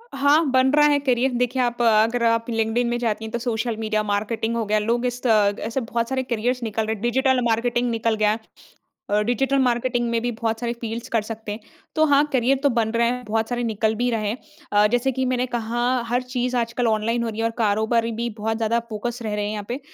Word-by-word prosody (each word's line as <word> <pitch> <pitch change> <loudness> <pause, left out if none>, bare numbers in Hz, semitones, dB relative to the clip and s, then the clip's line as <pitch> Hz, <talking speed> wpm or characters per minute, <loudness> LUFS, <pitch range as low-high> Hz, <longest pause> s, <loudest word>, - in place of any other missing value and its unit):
हाँ, 285 +4 +4
बन 260 +1 +4
रहा 295 0 +5
है 290 - +4
करियर 260 -1 +1
देखिए 250 +1 0
आप 240 -1 -1
अगर 230 +1 +3
आप 230 0 +2
लिंक्डइन 225 +1 0
में 240 - 0
जाती 220 -2 -1
हैं, 220 - -7
तो 235 - -2
सोशल 230 -1 -2
मीडिया 215 -1 0
मार्केटिंग 215 +2 -1
हो 230 -2 -1
गया। 215 +1 +1
लोग 235 +3 0
इस 250 0 -2
त - - +3 0.3
ऐसे 230 +4 -2
बहुत 230 +1 -2
सारे 260 -1 -1
करियर्स 245 +1 -1
निकल 220 0 -1
रहे 220 - -1
हैं 200 - -13
डिजिटल 260 +2 +2
मार्केटिंग 240 +2 +1
निकल 230 -1 0
गया, 215 0 +2 0.7
अ, 210 +1 +2
डिजिटल 270 +4 +1
मार्केटिंग 245 -1 +1
में 230 -1 0
भी 245 0 -1
बहुत 225 0 -2
सारे 240 -1 -2
फ़ील्ड्स 230 +2 -5
कर 230 -4 +1
सकते 220 -1 -7
हैं। 210 - -5 0.4
तो 315 - +3
हाँ 285 -1 +4
करियर 260 +1 +3
तो 285 - +5
बन 230 -3 +1
रहे 235 0 +2
हैं, 250 +1 -2
बहुत 220 +1 -1
सारे 245 0 -2
निकल 220 -1 0
भी 245 +2 0
रहे 215 -2 -1
हैं। 230 - -3 0.4
अ, 205 0 +5
जैसे 245 +2 +1
कि 260 +1 -1
मैंने 255 0 0
कहा 235 +1 -2 0.3
हर 245 +2 +1
चीज़ 250 0 -2
आजकल 235 +1 0
ऑनलाइन 225 +2 0
हो 230 - -2
रही 220 - -6
है 225 - 0
और 230 - 0
कारोबारी 225 +2 +1
भी 235 +1 -3
बहुत 220 +1 -2
ज़्यादा 230 +1 +1
फ़ोकस 235 +3 -4
रह 215 -2 -3
रहे 205 0 -1
हैं 210 - -2
यहाँ 210 -1 -4
पे। 250 +4 -3
235 Hz, 240 wpm, -23 LUFS, 220-245 Hz, 0.7 s, रहा